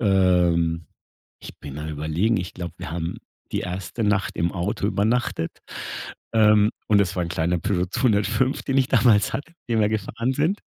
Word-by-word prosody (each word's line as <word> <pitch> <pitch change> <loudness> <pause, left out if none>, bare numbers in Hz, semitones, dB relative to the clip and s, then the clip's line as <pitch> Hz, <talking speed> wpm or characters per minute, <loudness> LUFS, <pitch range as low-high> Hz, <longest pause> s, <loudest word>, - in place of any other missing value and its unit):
ähm 90 -5 +3 0.5
ich - - -10
bin 70 -1 -8
mal 75 +1 -5
überlegen, 80 +9 0
ich 90 -1 -5
glaube, 85 -2 -5
wir 85 -3 -6
haben 85 0 -3 0.3
die - - 0
1. 95 +5 -4
Nacht 105 -2 +1
im 85 0 0
Auto 95 +2 -2
übernachtet. 110 -4 0 0.8
Ähm, 105 -1 +5 0.2
und 105 -1 +5
das 100 -3 +1
war 90 - +1
ein 85 - -3
kleiner 85 +1 0
Peugeot 90 -1 0
205, 110 +3 +1
den 135 0 +1
ich 130 - +2
damals 105 -5 +4
hatte, 150 +4 -4 0.2
den 115 -2 +2
wir 105 - +3
gefahren 110 +4 -1
sind. 155 +9 0
100 Hz, 175 wpm, -24 LUFS, 85-110 Hz, 0.8 s, Ähm